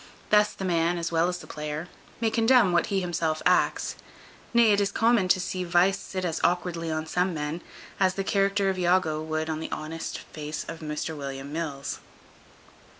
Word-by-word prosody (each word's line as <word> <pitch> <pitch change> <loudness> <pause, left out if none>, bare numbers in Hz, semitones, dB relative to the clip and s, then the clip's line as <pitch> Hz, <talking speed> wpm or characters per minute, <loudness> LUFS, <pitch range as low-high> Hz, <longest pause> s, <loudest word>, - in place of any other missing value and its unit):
Thus 210 0 +5
the 195 - -5
man, 170 -1 +1
as 170 0 -2
well 165 +1 +3
as 180 - -2
the - - -11
player, 150 +2 -5 0.3
may 225 -1 +1
condemn 230 -3 +5
what 175 0 +2
he 200 -3 0
himself 165 -3 -1
acts; - - +2 0.6
nay, 235 -2 +5
it 205 0 +3
is 200 - +1
common 225 -4 +3
to 185 - +4
see 185 0 -3
vice 180 +3 +3
sit 185 -2 -4
as 165 -2 -2
awkwardly 175 -2 0
on 155 0 -2
some 180 +2 0
men, 150 +3 -3 0.4
as 190 -1 +3
the 195 - -1
character 195 0 +2
of 185 - -4
Iago 175 -3 +2
would 155 0 -2
on 155 -1 -2
the 160 - -5
honest 160 +1 -4
face 150 0 -6
of 165 - -7
Mr 155 0 -4
William 140 0 -6
Mills. 150 -4 -4
175 Hz, 190 wpm, -27 LUFS, 155-195 Hz, 0.6 s, Thus